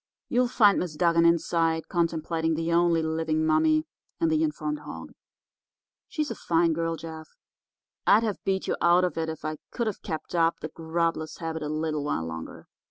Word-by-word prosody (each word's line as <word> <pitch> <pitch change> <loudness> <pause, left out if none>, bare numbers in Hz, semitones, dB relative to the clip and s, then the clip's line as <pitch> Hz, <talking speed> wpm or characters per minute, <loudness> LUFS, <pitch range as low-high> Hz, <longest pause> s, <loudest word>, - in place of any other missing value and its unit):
You'll 250 +1 +3
find 210 -4 +4
Miss 170 -4 -3
Dugan 170 +1 +4
inside 165 -1 +1
contemplating 165 -2 0
the 165 +1 -1
only 170 -1 +3
living 160 0 0
mummy 310 - +3 0.4
and 330 -1 +2
the 315 0 +2
informed 300 -1 -1
hog. - - -9 1.0
She's 305 -2 -2
a - - -4
fine 165 0 +2
girl, 165 +1 -1
Jeff. 160 -1 -9 0.8
I'd 215 +3 +6
have 215 -3 -3
beat 190 -1 0
you - - +1
out 175 +1 +5
if 160 -1 -4
I 155 0 -3
could 235 - -2
have 215 -3 -3
kept 160 +1 -5
up 165 -1 +2
the 155 - -5
grubless 165 0 -2
habit 160 -1 -4
a 150 - -3
little 155 -1 -2
while 80 - -1
longer. 80 0 -7
165 Hz, 170 wpm, -27 LUFS, 160-180 Hz, 1.0 s, I'd